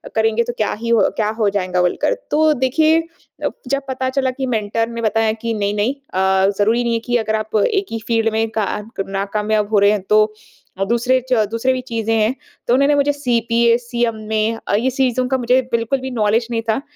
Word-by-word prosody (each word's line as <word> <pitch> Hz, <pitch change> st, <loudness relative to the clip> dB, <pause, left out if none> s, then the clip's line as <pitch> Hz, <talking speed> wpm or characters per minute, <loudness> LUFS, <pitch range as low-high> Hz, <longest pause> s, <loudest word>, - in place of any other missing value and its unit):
करेंगे 225 Hz, +1 st, +2 dB
तो 240 Hz, +1 st, -4 dB
क्या 215 Hz, -, 0 dB
ही 230 Hz, +1 st, -4 dB
हो 230 Hz, -2 st, +4 dB
क्या 215 Hz, -1 st, +1 dB
हो 210 Hz, -2 st, +3 dB
जाएँगा 185 Hz, -2 st, -1 dB
बोलकर। 180 Hz, -, +1 dB, 0.2 s
तो 310 Hz, +1 st, +4 dB
देखिए 310 Hz, +5 st, +2 dB, 0.6 s
जब 275 Hz, +2 st, 0 dB
पता 260 Hz, 0 st, -2 dB
चला 260 Hz, -1 st, 0 dB
कि 265 Hz, +1 st, -4 dB
मेंटर 225 Hz, -1 st, -1 dB
ने 235 Hz, 0 st, -5 dB
बताया 225 Hz, 0 st, +1 dB
कि 230 Hz, +1 st, -4 dB
नहीं 205 Hz, -1 st, -1 dB
नहीं 210 Hz, +5 st, +1 dB
अ, 190 Hz, -8 st, +1 dB
ज़रूरी 225 Hz, +4 st, +2 dB
नहीं 235 Hz, -1 st, 0 dB
है 230 Hz, -, +1 dB
कि 245 Hz, 0 st, +1 dB
अगर 220 Hz, -1 st, -1 dB
आप 215 Hz, 0 st, -4 dB
एक 395 Hz, -2 st, 0 dB
ही 225 Hz, -, -3 dB
फील्ड 225 Hz, -1 st, +2 dB
में 225 Hz, +1 st, +1 dB
का 215 Hz, -, +2 dB, 0.4 s
नाकामयाब 210 Hz, +2 st, -1 dB
हो 210 Hz, -, +4 dB
रहे 200 Hz, +1 st, +5 dB
हैं 210 Hz, -2 st, 0 dB
तो 215 Hz, 0 st, +4 dB, 0.6 s
दूसरे 240 Hz, +2 st, +2 dB
च 230 Hz, -4 st, +3 dB
दूसरे 230 Hz, +3 st, +1 dB
भी 255 Hz, -, -3 dB
चीज़ें 225 Hz, -1 st, -1 dB
हैं। 220 Hz, +3 st, +1 dB, 0.3 s
तो 235 Hz, -, +3 dB
उन्होंने 280 Hz, +3 st, +4 dB
मुझे 285 Hz, 0 st, +2 dB
सीपीए 235 Hz, -3 st, +2 dB
सीएमए 230 Hz, -3 st, -2 dB, 0.3 s
अ, -, -, +1 dB
ये 235 Hz, +5 st, +1 dB
सीज़ों 255 Hz, -1 st, 0 dB
का 265 Hz, +1 st, +1 dB
मुझे 250 Hz, +1 st, +2 dB
बिल्कुल 235 Hz, +3 st, 0 dB
भी 260 Hz, 0 st, -5 dB
नॉलेज 225 Hz, 0 st, +1 dB
नहीं 230 Hz, -1 st, 0 dB
था। 220 Hz, +5 st, +1 dB
230 Hz, 210 wpm, -19 LUFS, 215-255 Hz, 0.6 s, रहे